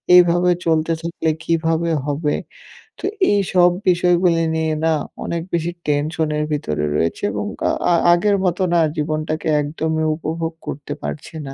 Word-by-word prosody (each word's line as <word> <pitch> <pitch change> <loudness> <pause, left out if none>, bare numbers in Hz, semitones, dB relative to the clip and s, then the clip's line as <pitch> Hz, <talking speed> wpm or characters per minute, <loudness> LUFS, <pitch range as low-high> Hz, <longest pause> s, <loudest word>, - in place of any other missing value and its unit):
এইভাবে 175 0 +5
চলতে 160 0 +2
থাকলে 165 -1 -2
কিভাবে 165 0 0
হবে। 145 +1 -1 0.6
তো - - -14 0.3
এইসব 185 -3 +4 0.2
বিষয়গুলি 175 -1 +3
নিয়ে 160 -1 0
না 165 - +3 0.3
অনেক 170 0 -2
বেশি 170 0 0 0.2
টেনশনের 150 +1 0
ভিতরে 75 - -2
রয়েছে 80 +2 -1
এবং - - -3 0.2
কা - - +2 0.2
আ - - +5 0.2
আগের 200 +3 +2
মতো 180 +1 0
না 170 - +4 0.2
জীবনটাকে 155 +1 -2
একদমই 160 +1 -2
উপভোগ 165 +1 -3
করতে 145 0 -5
পারছি 155 - -6
না। 135 - -6
160 Hz, 140 wpm, -20 LUFS, 155-170 Hz, 0.6 s, এইভাবে